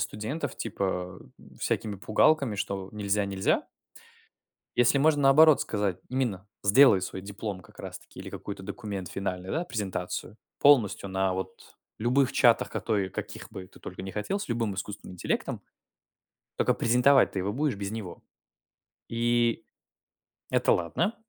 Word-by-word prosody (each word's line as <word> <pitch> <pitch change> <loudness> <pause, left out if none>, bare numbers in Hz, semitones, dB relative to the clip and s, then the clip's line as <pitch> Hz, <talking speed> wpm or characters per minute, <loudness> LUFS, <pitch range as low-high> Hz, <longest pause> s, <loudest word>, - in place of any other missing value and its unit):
студентов 135 +7 -3
типа 90 -4 -3 0.4
всякими 105 -2 -1
пугалками, 115 +5 +3
что 100 -1 -3
нельзя 105 -1 0
нельзя 95 -1 0 1.1
если 120 +3 +4
можно 145 0 +3
наоборот 150 +2 +7
сказать 100 -5 -1
именно: 115 -7 -2 0.2
сделай 100 -1 +6
свой 95 +1 -5
диплом 100 0 -5
как - - -19
раз - - -7
таки - - -15
или - - -7
какой-то 100 -1 -7
документ 100 -3 -5
финальный, 95 -1 -4
да, 170 +3 -1
презентацию 100 - -4 0.2
полностью 115 -8 +4
на 95 0 0
вот 95 0 -7 0.2
любых 125 +4 +2
чатах, 120 -3 +4
какой 100 -4 -1
каких - - -7
бы 90 -1 -8
ты - - -18
только 90 - -8
ни 95 - -6
хотел, 110 - -2
с - - -5
любым 115 -4 -1
искусственным 100 -1 -6
интеллектом, 90 - -2 1.0
только - - +2
презентовать 125 +3 +4
ты 95 - -2
его 100 +2 -2
будешь 145 +3 0
без 100 0 -4
него. 105 -6 -7 0.9
И 120 0 +1 0.9
это - - +3
ладно, 165 - 0
105 Hz, 140 wpm, -28 LUFS, 95-125 Hz, 1.1 s, наоборот